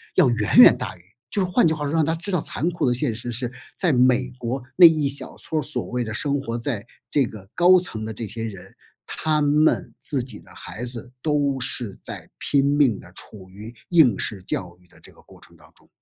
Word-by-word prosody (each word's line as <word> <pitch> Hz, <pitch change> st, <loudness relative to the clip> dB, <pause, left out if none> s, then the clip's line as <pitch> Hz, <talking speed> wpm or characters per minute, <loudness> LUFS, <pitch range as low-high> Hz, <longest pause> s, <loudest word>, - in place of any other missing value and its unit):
要 170 Hz, -9 st, +5 dB
远 115 Hz, -4 st, 0 dB
远 -, -, +9 dB
大 -, -, -6 dB
于 -, -, -21 dB, 0.3 s
就 200 Hz, -, -1 dB
是 180 Hz, -, -4 dB
换 175 Hz, -, +4 dB
句 160 Hz, -, +1 dB
话 155 Hz, -2 st, -5 dB
说， 145 Hz, -, -3 dB
让 165 Hz, -1 st, +2 dB
他 160 Hz, +2 st, 0 dB
知 180 Hz, +5 st, -3 dB
道 180 Hz, -, +1 dB
残 165 Hz, +3 st, -2 dB
酷 175 Hz, -, -1 dB
的 125 Hz, -, +2 dB
现 125 Hz, -1 st, 0 dB
实 120 Hz, +2 st, -4 dB
是， 120 Hz, +1 st, -2 dB, 0.3 s
在 180 Hz, -, +1 dB
美 125 Hz, -1 st, +2 dB
国 125 Hz, +2 st, -4 dB
那 180 Hz, -2 st, +10 dB
一 155 Hz, -3 st, +1 dB
小 140 Hz, -, -4 dB
撮 155 Hz, -1 st, -3 dB
所 150 Hz, +2 st, -3 dB
谓 125 Hz, 0 st, -3 dB
的 110 Hz, -, -6 dB
生 145 Hz, +5 st, -1 dB
活 115 Hz, -3 st, -4 dB
在 115 Hz, -3 st, -4 dB, 0.2 s
这 140 Hz, -3 st, +3 dB
个 105 Hz, -4 st, -11 dB
高 180 Hz, +1 st, +5 dB
层 145 Hz, -12 st, -2 dB
的 110 Hz, -, -5 dB
这 115 Hz, +2 st, -5 dB
些 115 Hz, +2 st, -5 dB
人， 100 Hz, -5 st, -9 dB, 0.3 s
他 155 Hz, -1 st, -1 dB
们 150 Hz, +2 st, +1 dB
自 135 Hz, -4 st, -1 dB
己 120 Hz, -4 st, -7 dB
的 -, -, -20 dB
孩 115 Hz, -, -8 dB
子 120 Hz, 0 st, -2 dB
都 145 Hz, -2 st, 0 dB
是 120 Hz, -4 st, +5 dB
在 -, -, -9 dB
拼 140 Hz, -1 st, +1 dB
命 140 Hz, -6 st, +2 dB
地 90 Hz, -, -15 dB
处 95 Hz, 0 st, -8 dB
于 105 Hz, +5 st, -11 dB
应 150 Hz, -, +4 dB
试 100 Hz, -4 st, -1 dB
教 90 Hz, -1 st, -4 dB
育 90 Hz, -, -26 dB
的 -, -, -22 dB
这 -, -, -15 dB
个 -, -, -21 dB
过 -, -, -19 dB
程 -, -, -17 dB
当 -, -, -21 dB
中。 -, -, -22 dB
130 Hz, 255 characters per minute, -22 LUFS, 115-150 Hz, 0.3 s, 那